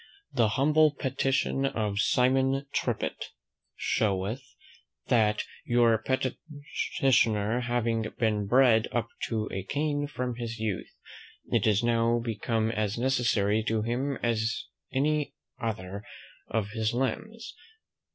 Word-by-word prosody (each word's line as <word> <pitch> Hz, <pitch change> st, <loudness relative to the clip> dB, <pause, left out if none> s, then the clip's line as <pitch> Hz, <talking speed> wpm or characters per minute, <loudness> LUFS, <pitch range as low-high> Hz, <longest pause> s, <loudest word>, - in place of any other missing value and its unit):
"The 120 Hz, -4 st, +3 dB
humble 150 Hz, +2 st, +4 dB
petition 135 Hz, +1 st, 0 dB
of 105 Hz, -6 st, -1 dB
SIMON 130 Hz, +4 st, +2 dB
TRIPPIT, -, -, -1 dB, 0.5 s
"Showeth, 100 Hz, +4 st, 0 dB, 0.7 s
"That 110 Hz, -3 st, +3 dB, 0.2 s
your 120 Hz, -1 st, +4 dB
petitioner 130 Hz, -4 st, 0 dB
having 115 Hz, -3 st, -1 dB
been 105 Hz, -3 st, +1 dB
bred 120 Hz, -2 st, +5 dB
up 115 Hz, -1 st, -1 dB, 0.2 s
to 110 Hz, -2 st, -1 dB
a 95 Hz, -, -3 dB
cane 145 Hz, +7 st, -1 dB
from 125 Hz, -4 st, -4 dB
his 115 Hz, -1 st, -4 dB
youth, 110 Hz, -4 st, -3 dB, 0.6 s
it -, -, +2 dB
is 105 Hz, +1 st, +3 dB
now 115 Hz, 0 st, +3 dB
become 115 Hz, -1 st, -1 dB
as 110 Hz, -1 st, -1 dB
necessary 115 Hz, -5 st, +2 dB
to 110 Hz, -1 st, 0 dB
him 130 Hz, +4 st, -1 dB
as 115 Hz, -1 st, 0 dB, 0.3 s
any 145 Hz, +1 st, 0 dB, 0.3 s
other 100 Hz, -3 st, -4 dB, 0.4 s
of 105 Hz, -2 st, -1 dB
his 110 Hz, +1 st, -1 dB
limbs. 215 Hz, -, -3 dB
115 Hz, 110 wpm, -28 LUFS, 110-135 Hz, 0.7 s, bred